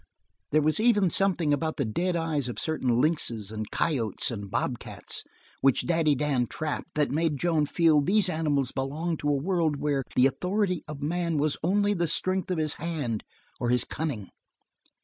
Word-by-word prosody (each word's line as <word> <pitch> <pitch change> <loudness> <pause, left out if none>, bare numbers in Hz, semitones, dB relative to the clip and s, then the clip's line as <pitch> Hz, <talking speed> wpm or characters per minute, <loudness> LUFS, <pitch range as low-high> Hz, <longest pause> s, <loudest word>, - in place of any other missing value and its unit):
There 155 0 +3
was 155 +4 +2
even 210 -6 +4
something 175 -6 +2
about 155 +2 -1
the 140 - 0
dead 175 +12 -1
eyes 160 -5 -1
of 120 - -6
certain 130 -7 0
lynxes 120 - 0
and 110 -1 -5
coyotes 120 - 0
and 100 -3 -6
bobcats 120 +4 -3 0.4
which 135 -2 +3
Daddy 160 -4 +2
Dan 135 -3 +1
trapped 155 +4 -4
that 150 -1 +1
made 155 0 +1
Joan 155 -1 +1
feel 160 -2 +4
these 190 +5 +3
animals 150 -6 0
belonged 155 +5 -2
to 145 - -1
a - - +3
world 165 -1 +1
where 140 -1 0
the 125 - +5
authority 180 +6 0
of 150 -2 -7
man 170 +1 0
was 145 0 +2
only 205 +4 +2
the 170 -3 0
strength 185 +3 0
of 180 - 0
his 155 -2 0
hand 145 -10 -2 0.4
or 120 - -1
his 125 -1 +3
cunning. 140 - -4
155 Hz, 175 wpm, -27 LUFS, 135-170 Hz, 0.4 s, the